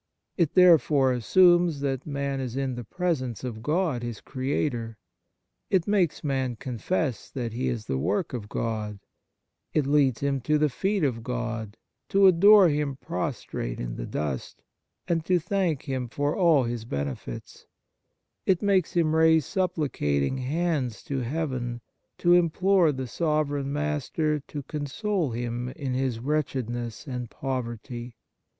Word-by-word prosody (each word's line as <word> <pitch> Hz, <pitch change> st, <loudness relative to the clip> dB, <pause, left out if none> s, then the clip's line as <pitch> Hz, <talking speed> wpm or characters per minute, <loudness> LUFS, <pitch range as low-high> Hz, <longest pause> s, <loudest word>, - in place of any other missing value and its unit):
It 170 Hz, -5 st, +1 dB
therefore 155 Hz, -7 st, +5 dB
assumes 175 Hz, +5 st, +4 dB
that 135 Hz, -1 st, -2 dB
man 140 Hz, -1 st, -2 dB
is 130 Hz, -2 st, -4 dB
in 135 Hz, -1 st, -1 dB
the 120 Hz, 0 st, -5 dB
presence 130 Hz, -, -2 dB
of 115 Hz, -4 st, -5 dB
God, 155 Hz, -1 st, 0 dB
his 120 Hz, -3 st, -5 dB
Creator; 130 Hz, -4 st, -2 dB, 0.7 s
it 185 Hz, -4 st, +2 dB
makes 195 Hz, -6 st, +1 dB
man 130 Hz, -4 st, -1 dB
confess 130 Hz, -, -2 dB
that 120 Hz, -4 st, -4 dB
he 125 Hz, +3 st, -2 dB
is 115 Hz, -3 st, -2 dB
the 65 Hz, -7 st, -1 dB
work 175 Hz, -, -1 dB
of 105 Hz, -4 st, -5 dB
God; 110 Hz, -3 st, -3 dB, 0.8 s
it 150 Hz, -, +3 dB
leads 140 Hz, -4 st, +3 dB
him 140 Hz, -1 st, 0 dB
to 150 Hz, +5 st, +2 dB
the 150 Hz, 0 st, +2 dB
feet 195 Hz, +7 st, -1 dB
of 125 Hz, -5 st, 0 dB
God, 115 Hz, -3 st, -4 dB, 0.3 s
to 195 Hz, 0 st, +5 dB
adore 195 Hz, +2 st, +8 dB
Him 145 Hz, -3 st, 0 dB
pros 150 Hz, -3 st, -4 dB
trate -, -, -4 dB
in -, -, -4 dB
the -, -, -5 dB
dust, 70 Hz, -4 st, -4 dB, 0.4 s
and 165 Hz, -2 st, +1 dB
to 180 Hz, 0 st, +3 dB
thank 175 Hz, -3 st, -1 dB
Him 130 Hz, -3 st, -3 dB
for 145 Hz, +4 st, -1 dB
all 165 Hz, -8 st, +4 dB
His 120 Hz, -1 st, -3 dB
benefits; 70 Hz, -, -6 dB, 0.8 s
it 190 Hz, 0 st, +3 dB
makes 195 Hz, -4 st, +2 dB
him 160 Hz, -2 st, +2 dB
raise 160 Hz, -2 st, +5 dB
supplicating 135 Hz, -, 0 dB
hands 140 Hz, -3 st, -1 dB
to 135 Hz, -1 st, -3 dB
Heaven, 125 Hz, -3 st, -2 dB, 0.4 s
to 175 Hz, 0 st, +4 dB
im 175 Hz, -1 st, +5 dB
plore 185 Hz, -1 st, +3 dB
the 130 Hz, -2 st, -4 dB
sovereign 145 Hz, 0 st, -1 dB
Master 150 Hz, +1 st, -1 dB
to 145 Hz, +1 st, -7 dB
console 155 Hz, +5 st, -2 dB
him 120 Hz, +1 st, -3 dB
in 135 Hz, -1 st, -4 dB
his 130 Hz, -2 st, 0 dB
wretchedness 120 Hz, -4 st, -2 dB
and 125 Hz, -4 st, -5 dB
poverty. 120 Hz, -2 st, -5 dB
140 Hz, 145 wpm, -26 LUFS, 120-160 Hz, 0.8 s, adore